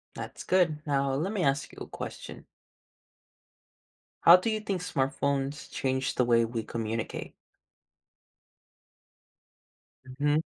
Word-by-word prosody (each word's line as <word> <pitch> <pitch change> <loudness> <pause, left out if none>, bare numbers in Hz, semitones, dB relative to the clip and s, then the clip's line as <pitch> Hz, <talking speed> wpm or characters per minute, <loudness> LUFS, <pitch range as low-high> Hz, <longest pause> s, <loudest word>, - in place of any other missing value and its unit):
That's - - -7
good, 175 -5 +3
now 140 -1 +1
let 165 +9 -1
me 190 -4 0
ask 140 +1 +1
you - - -14
a - - -6
question. - - -8 1.8
How 170 +2 +10
do 185 - -1
you 215 -1 0
think 195 -4 -2
smartphones 140 -1 -1
change 130 0 -1
the 125 - +3
way 115 -1 +4
we 115 -1 -3
communicate? 115 0 -4 2.9
Mhm. 145 +1 +3
140 Hz, 115 wpm, -29 LUFS, 130-170 Hz, 2.9 s, How